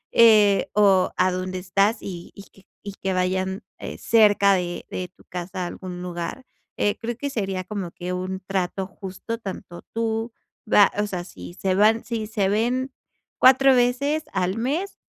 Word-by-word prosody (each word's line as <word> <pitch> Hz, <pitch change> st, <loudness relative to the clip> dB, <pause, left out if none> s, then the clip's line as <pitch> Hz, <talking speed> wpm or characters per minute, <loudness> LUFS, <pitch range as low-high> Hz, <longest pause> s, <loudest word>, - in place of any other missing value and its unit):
eh, 215 Hz, -4 st, +6 dB
o 195 Hz, -3 st, +4 dB
a 185 Hz, 0 st, +3 dB
dónde 185 Hz, 0 st, -3 dB
estás 195 Hz, +4 st, +1 dB
y 175 Hz, -3 st, -8 dB
y 200 Hz, -, -10 dB
que 195 Hz, -, -22 dB, 0.2 s
y 200 Hz, -1 st, -6 dB
que 190 Hz, 0 st, -1 dB
vayan, 185 Hz, +2 st, -1 dB, 0.2 s
eh, -, -, -7 dB
cerca 205 Hz, -3 st, +4 dB
de 175 Hz, -2 st, -2 dB
de 185 Hz, -, -4 dB
tu -, -, -21 dB
casa 180 Hz, +1 st, -5 dB
a -, -, -2 dB
algún 180 Hz, 0 st, -7 dB
lugar. 175 Hz, +8 st, -5 dB, 0.3 s
Eh, 205 Hz, -, +1 dB
creo 235 Hz, 0 st, -4 dB
que 285 Hz, +2 st, -3 dB
sería 195 Hz, -5 st, -2 dB
como 195 Hz, -2 st, -5 dB
que 180 Hz, +1 st, -5 dB
un 185 Hz, +1 st, -3 dB
trato 190 Hz, 0 st, -2 dB
justo 190 Hz, +4 st, -7 dB
tanto 185 Hz, -4 st, -8 dB
tú, 225 Hz, 0 st, -1 dB, 0.4 s
va 205 Hz, -1 st, +6 dB
o 210 Hz, -, +1 dB
sea, 180 Hz, -3 st, -4 dB
si 90 Hz, -, -11 dB
se 190 Hz, -1 st, 0 dB
van 215 Hz, +4 st, +4 dB
si 225 Hz, -2 st, -3 dB
se 210 Hz, -3 st, 0 dB
ven 245 Hz, +5 st, 0 dB, 0.5 s
4 265 Hz, +1 st, +6 dB
veces 265 Hz, +5 st, +1 dB
al 185 Hz, +2 st, 0 dB
mes, 295 Hz, +12 st, -2 dB
195 Hz, 175 wpm, -24 LUFS, 185-225 Hz, 0.5 s, eh